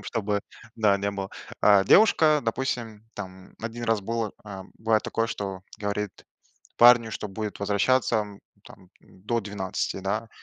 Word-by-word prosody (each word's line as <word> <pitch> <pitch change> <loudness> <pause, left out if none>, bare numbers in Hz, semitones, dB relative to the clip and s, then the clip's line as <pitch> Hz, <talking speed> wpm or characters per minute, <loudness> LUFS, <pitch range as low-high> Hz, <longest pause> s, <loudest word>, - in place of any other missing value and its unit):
сделаем, - - -15
чтобы, 105 -3 -1 0.4
да, 105 -3 +3
не 100 +1 -1
было. 100 -1 -5 0.3
Э, 100 -2 +6
девушка, 155 - +5
допустим, 115 -3 -3
там, 95 -2 -9
1 115 +1 -5
раз 115 -2 +1
было, 115 +1 -3
э, 100 -3 -8 0.2
было 110 -1 +2
такое, 115 +1 -1
что 95 -4 -5 0.2
говорит 105 -1 -2 0.7
парню, 120 -1 +7
что 105 - -5
будет 105 +1 -5
возвращаться, 110 +5 +2
м, 105 -2 -5 0.2
там 90 -1 -16
до 105 +5 -4
12, 95 -2 -3
да? 100 +4 -2
105 Hz, 150 wpm, -26 LUFS, 100-115 Hz, 0.7 s, парню